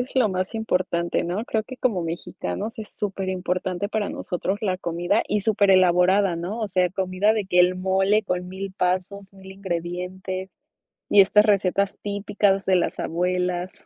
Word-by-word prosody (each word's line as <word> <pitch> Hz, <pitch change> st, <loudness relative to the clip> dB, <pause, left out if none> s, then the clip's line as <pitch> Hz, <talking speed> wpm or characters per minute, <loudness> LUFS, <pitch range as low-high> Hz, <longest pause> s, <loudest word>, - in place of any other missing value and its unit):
es 250 Hz, -, -5 dB
lo 255 Hz, -5 st, +3 dB
más 185 Hz, +3 st, -3 dB
importante, 180 Hz, -6 st, -1 dB
¿no? 185 Hz, +6 st, -2 dB
Creo 220 Hz, -1 st, 0 dB
que 260 Hz, -, -9 dB
como 215 Hz, -9 st, 0 dB
mexicanos, 165 Hz, -, -5 dB
es 215 Hz, -1 st, -7 dB
superimportante, 185 Hz, -1 st, -2 dB
para 215 Hz, -1 st, -1 dB
nosotros 190 Hz, +1 st, -3 dB
la 190 Hz, -4 st, 0 dB
comida. 175 Hz, +4 st, 0 dB
Y 210 Hz, -, 0 dB
súper 200 Hz, -1 st, +2 dB
elaborada, 185 Hz, 0 st, +4 dB
¿no?, 190 Hz, +7 st, -4 dB
o 215 Hz, -, -2 dB
sea, 180 Hz, -1 st, +1 dB
comida, 190 Hz, +2 st, +1 dB
de 215 Hz, -3 st, -2 dB
que 180 Hz, -1 st, +1 dB
el 180 Hz, +1 st, +5 dB
mole 190 Hz, +3 st, +2 dB
con 180 Hz, -3 st, -3 dB
1000 190 Hz, +1 st, -6 dB
pasos, 190 Hz, +1 st, -2 dB
1000 190 Hz, -1 st, -13 dB
ingredientes. 185 Hz, +1 st, -4 dB, 0.6 s
Y 205 Hz, -, +7 dB
estas 210 Hz, +2 st, +5 dB
recetas, 200 Hz, -1 st, +1 dB
típicas 200 Hz, -1 st, 0 dB
de 190 Hz, -, +3 dB
las 175 Hz, -, -1 dB
abuelas. 180 Hz, +1 st, -1 dB
190 Hz, 165 wpm, -24 LUFS, 180-205 Hz, 0.6 s, Y